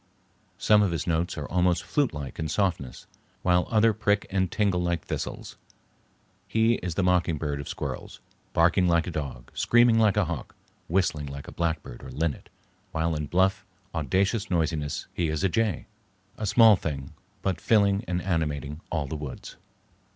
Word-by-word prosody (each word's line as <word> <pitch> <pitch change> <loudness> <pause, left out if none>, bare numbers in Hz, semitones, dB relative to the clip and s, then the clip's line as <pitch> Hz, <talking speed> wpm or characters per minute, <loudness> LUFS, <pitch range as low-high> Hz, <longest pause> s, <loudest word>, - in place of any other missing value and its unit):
Some 105 +2 +5
of 100 - +3
his 85 -3 -2
notes 85 +1 -1
are 75 - -4
almost 90 0 +1
flutelike 75 - -2
in 80 - -1
softness, 80 -7 -1 0.4
while 90 0 +3
others 110 -1 +3
prick 105 0 +2
and 95 -2 0
tingle 100 -4 +1
like 85 -3 -1
thistles. - - -5 0.9
He 115 +1 +3
is 85 -2 -3
the 95 - +1
mockingbird 80 -5 +1
of 70 - -8
squirrels, - - -5 0.3
barking 90 +2 +3
like 85 -1 +3
a 90 - -4
dog, 70 -6 -6
screaming 120 -1 +4
like 105 -2 +3
a 105 - +3
hawk, 80 -4 -5 0.3
whistling 80 -5 0
like 70 0 -8
a - - -8
blackbird 80 -7 -3
or - - -8
linnet, 80 -1 -3 0.4
while 80 +1 0
in 75 -1 -3
bluff, 95 +4 +2 0.3
audacious 95 - 0
noisiness 80 -4 -1
he 85 - 0
is 75 -1 -2
a 95 - +3
jay. 105 -4 0 0.5
A 110 - -3
small 110 +1 +7
thing, 75 -5 -5 0.3
but 95 -4 -1
filling 100 -2 +3
and 90 0 -1
animating 75 -4 -2
all 80 -4 -1
the 70 - -5
woods. 75 -3 -7
85 Hz, 165 wpm, -27 LUFS, 75-100 Hz, 0.9 s, small